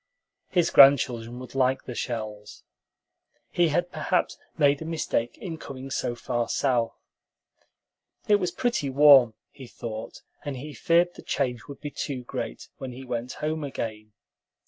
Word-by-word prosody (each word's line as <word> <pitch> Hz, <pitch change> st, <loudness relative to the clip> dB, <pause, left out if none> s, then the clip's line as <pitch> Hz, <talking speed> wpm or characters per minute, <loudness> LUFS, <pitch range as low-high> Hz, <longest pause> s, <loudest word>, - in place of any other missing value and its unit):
His 175 Hz, -3 st, +2 dB
grandchildren 120 Hz, -4 st, +5 dB
would 130 Hz, 0 st, -9 dB
like 130 Hz, 0 st, +1 dB
the 125 Hz, -, -7 dB
shells. 110 Hz, -4 st, -5 dB, 0.9 s
He 175 Hz, -1 st, +3 dB
had 175 Hz, +3 st, 0 dB
perhaps 185 Hz, -, -1 dB, 0.2 s
made 145 Hz, -2 st, +3 dB
a -, -, -3 dB
mistake 155 Hz, -7 st, -2 dB
in 165 Hz, -5 st, -6 dB
coming 135 Hz, 0 st, -8 dB
so 120 Hz, -, -1 dB
far 120 Hz, -1 st, -2 dB
south. 125 Hz, -4 st, 0 dB, 1.3 s
It 210 Hz, -, +5 dB
was 180 Hz, -3 st, -1 dB
pretty 180 Hz, -, -1 dB
warm, 135 Hz, -4 st, +7 dB, 0.2 s
he 130 Hz, -3 st, -11 dB
thought, 110 Hz, -2 st, -7 dB, 0.2 s
and 145 Hz, -3 st, -4 dB
he 150 Hz, +4 st, -7 dB
feared 170 Hz, +3 st, +2 dB
the -, -, -12 dB
change 125 Hz, -4 st, -2 dB
would 140 Hz, -1 st, -10 dB
be 145 Hz, -, -5 dB
too 130 Hz, -3 st, -4 dB
great -, -, -6 dB
when 130 Hz, -2 st, -6 dB
he 130 Hz, +2 st, -9 dB
went 125 Hz, 0 st, -4 dB
home 155 Hz, 0 st, -2 dB
again. 110 Hz, -6 st, -5 dB
135 Hz, 150 wpm, -26 LUFS, 120-150 Hz, 1.3 s, warm